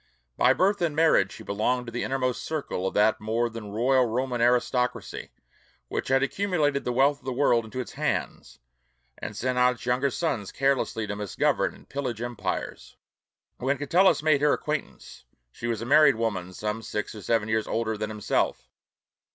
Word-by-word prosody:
By 125 - +4
birth 195 +8 +1
and 165 -4 0
marriage 155 -12 +4
she - - -10
belonged 125 +5 -1
to 115 - -7
the 120 - -3
innermost 130 -2 -1
circle 140 -12 -3
of - - -5
that 105 +1 +3
more 115 +2 0
than 110 -2 -7
royal 125 +4 +2
Roman 125 +1 -1
aristocracy 125 +1 0 0.6
which - - -3
had 135 +1 +3
accumulated 150 -4 0
the 125 - 0
wealth 140 +3 +3
of - - -25
the 130 - -2
world 120 -3 +2
into 120 +4 -7
its 125 - -5
hands, - - -3 0.6
and 105 - -6
sent 125 0 -1
out 125 0 +4
its 115 - -12
younger 125 +3 +1
sons 130 - -2
carelessly 135 -5 0
to 105 0 -4
misgovern 105 -1 0
and - - -18
pillage 130 -5 -4
empires. 120 -1 -4 0.6
When 135 +3 0
Catullus 170 +4 +3
made 155 -3 +3
her 150 0 +4
acquaintance, 150 - -5 0.3
she 115 - -6
was 115 -1 -2
a - - -5
married 145 0 +6
woman 105 -6 -2
some 105 +4 -3
six 105 -2 -4
or 105 - -9
seven 110 0 0
years 110 0 0
older 110 -1 -1
than 105 0 -3
himself. 105 -1 -1
125 Hz, 180 wpm, -26 LUFS, 110-140 Hz, 0.6 s, married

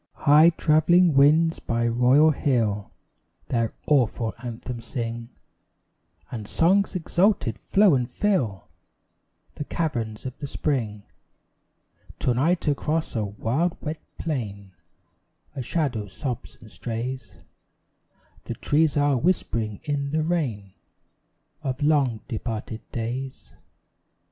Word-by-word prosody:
High 150 +3 +8
travelling 165 +1 +4
winds 155 +4 +4
by 115 0 -1
royal 125 +6 +5
hill 115 -8 0 0.6
Their 115 -2 +1 0.2
awful 120 -5 +2
anthem 120 0 -6
sing, 115 -1 -5 1.0
And 110 -4 -6
songs 190 - +2
exalted 180 - +1
flow 200 -3 +4
and 125 -3 +1
fill 130 - 0 0.9
The - - -5
caverns 120 -10 -3
of 130 0 -5
the 145 - -4
spring. 115 -8 -2 1.1
To 125 - +1
night 160 +8 +1
across 150 +2 -1
a 110 - 0
wild 115 - -1
wet 155 +1 -5 0.2
plain 100 - -4 0.8
A 135 - -3
shadow 125 -6 -1
sobs 125 +4 -6
and 110 -2 -15
strays; 125 +3 -5 1.1
The - - -4
trees 150 0 +2
are 145 -2 +3
whispering 115 - -1
in 145 -2 -2
the 155 0 +1
rain 125 - -2 0.9
Of 135 0 -3
long 140 -7 +2
departed 110 -2 -4
days. 125 +3 -5
130 Hz, 110 wpm, -25 LUFS, 115-155 Hz, 1.1 s, High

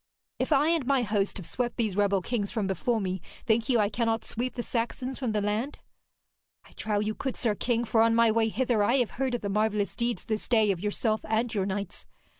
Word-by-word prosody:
'If - - -1
I 295 +2 +4
and 325 -6 +1
my 275 -3 +3
host 205 -2 0
have 190 - -7
swept 240 +4 -2
these 220 -6 0
rebel 200 -2 +2
kings 210 -3 -1
from 215 -3 -1
before 205 +5 0
me, 185 -3 -3 0.2
think 225 +2 +1
you 245 - +4
I 210 -2 +3
cannot 225 0 -1
sweep 250 +2 -3
the 240 - -3
Saxons 250 +3 -2
from 250 -4 -1
the 210 -1 0
land?' 215 +7 -1 0.9
'I - - -18
trow 210 -1 -1
you 215 +1 -1
could, 265 +3 -4
sir 230 -4 +2
king, 235 +2 0
for 225 0 +3
on 230 0 +4
my 230 -1 +5
way 225 0 +2
hither 240 -1 +1
I 235 +5 +3
have 245 -4 +1
heard 260 -2 +1
of 240 - -4
the 200 - -3
marvellous 210 0 0
deeds 235 0 -2
this 215 -2 -3
day 220 -4 +4
of 185 - -2
yourself 215 +2 0
and 225 +2 0
your 195 -3 0
knights. 200 -1 -4
225 Hz, 230 wpm, -28 LUFS, 205-240 Hz, 0.9 s, my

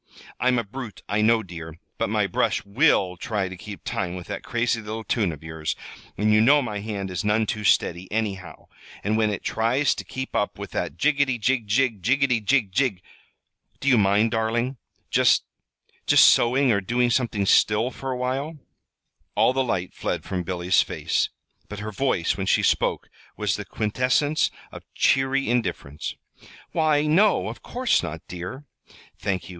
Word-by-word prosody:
I'm 125 +1 +2
a 120 - 0
brute, 115 0 -8
I 105 +1 0
know, 110 +1 +3
dear, 85 -3 -9 0.2
but - - 0
my - - +1
brush - - 0
will 95 -2 +2
try 100 0 -2
to 95 - -7
keep 100 +2 -10
time 90 -1 -3
with 90 -1 -7
that 100 - -4
crazy 120 -1 -1
little 110 +1 -6
tune 105 -6 0
of 75 -1 -10
yours, 80 -1 -4 0.4
and 105 +1 +2
you 105 - +5
know 140 +6 +6
my 105 -4 -4
hand 100 -2 -4
is 90 -3 -3
none 105 +1 +2
too 105 0 -3
steady, 90 -2 +1
anyhow, 100 -4 -4 0.4
and 105 +2 0
when 110 -1 +2
it 105 - -4
tries 120 +5 +1
to - - -7
keep 130 0 -6
up 105 - 0
with - - -7
that - - -3
jiggety, 140 -3 +2
jig, 120 -1 0
jig, 115 -1 +1
jiggety, 125 +1 +2
jig, 110 -3 +2
jig! 110 -5 0 0.8
Do 140 - -5
you 130 - +6
mind, 105 +1 +3
darling, 120 +3 -1 0.3
just - - +4 0.6
just - - +7
sewing, 130 +2 +4
or 100 -2 +2
doing 120 +5 +1
something 115 -5 0
still 110 +5 +3
for 135 - -6
a 130 - -2
while?" 135 +5 -3 0.8
All 125 - +4
the 135 0 +1
light 95 -7 -2
fled - - -3
from 95 -2 -3
Billy's 90 +1 +1
face, - - -1 0.4
but 105 - -7
her 105 +1 -5
voice, 115 -7 0
when - - -4
she - - +3
spoke, - - +1 0.3
was - - 0
the - - -6
quintessence 125 +7 +1 0.2
of - - -9
cheery 135 +1 +2
indifference. 110 - -2 0.6
"Why, 155 -2 +2
no, 190 +8 +3
of - - -9
course 250 0 +1
not, 80 +1 -6
dear." 90 +11 -7 0.5
"Thank 95 -2 -2
you. - - -12
110 Hz, 175 wpm, -24 LUFS, 100-130 Hz, 0.8 s, just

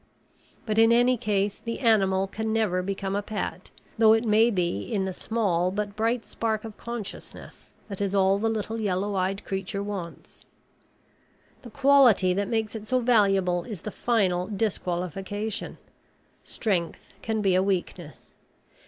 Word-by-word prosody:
But 215 -1 0
in 225 0 +6
any 245 +2 +4
case 205 -3 -1
the 230 -1 -5
animal 195 -6 +3
can 220 +3 -4
never 215 -5 +1
become 195 +1 -3
a 205 - 0
pet, 210 +1 -5 0.3
though 220 -1 +7
it 225 +1 +1
may 220 +2 +4
be 180 - -1
in 195 - -2
the 190 - -3
small 185 -5 0
but 205 +1 -3
bright 225 +2 0
spark 220 -1 -2
of 220 -2 -8
consciousness 235 -4 -8 0.2
that 200 -2 -6
is 200 0 -1
all 195 0 +3
the 225 +2 +1
little 225 +1 -3
yellow 200 0 -1
eyed 190 +1 -1
creature 195 +1 -3
wants. 195 -5 -7 1.2
The 245 - -11
quality 265 -8 +5
that 200 +2 -1
makes 220 -1 -1
it 215 -1 -7
so 255 +1 +2
valuable 195 -7 +2
is 210 -8 -7
the 215 - -6
final 190 -7 0
disqualification. 195 0 -3 0.7
Strength 185 -7 -2 0.2
can 220 -1 -2
be 195 -2 +3
a 185 - +4
weakness. 180 -4 -4
205 Hz, 155 wpm, -26 LUFS, 190-225 Hz, 1.2 s, though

